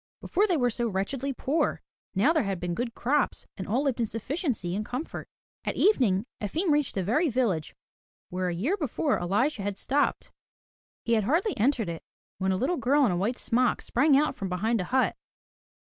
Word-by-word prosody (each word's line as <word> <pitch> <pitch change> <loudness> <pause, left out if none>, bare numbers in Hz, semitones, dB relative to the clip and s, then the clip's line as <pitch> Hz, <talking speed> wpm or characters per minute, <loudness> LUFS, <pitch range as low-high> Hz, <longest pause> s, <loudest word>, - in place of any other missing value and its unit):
Before 405 +4 +1
they 360 -5 +2
were 245 -3 +2
so 235 +1 -1
wretchedly 235 +7 -2
poor, 295 +4 -1 0.3
now 225 - +4
there 315 - +3
had 195 -4 -2
been 175 0 -2
good 235 +4 -3
crops 280 +2 0
and 190 - -6
all 245 +7 +1
lived 270 -4 0
in 230 - +1
sufficiency 225 - -2
and 210 - -1
comfort. 250 +8 -5 0.4
At - - -2
evening, 235 - +3 0.2
Efim 315 - 0
reached 295 -1 +1
the 190 - 0
very 295 - +2
village 220 - 0 0.5
where 180 0 -1
the 170 - -4
year 290 - +1
before 295 - 0
Elisha 205 - 0
had 200 0 -3
stopped. 285 +7 0 0.7
He 235 - +2
had 215 -3 +2
hardly 350 - +1
entered 235 -1 +1
it 165 -1 -5 0.4
when 190 0 +1
a 190 - +1
little 305 - 0
girl 275 +4 +3
in 220 - +2
a - - 0
white 210 +8 0
smock, 245 +1 +1
sprang 280 +3 +3
out 300 +2 +2
from 195 - -4
behind 210 +4 0
a - - -3
hut. 260 +6 +1
240 Hz, 195 wpm, -27 LUFS, 195-285 Hz, 0.7 s, now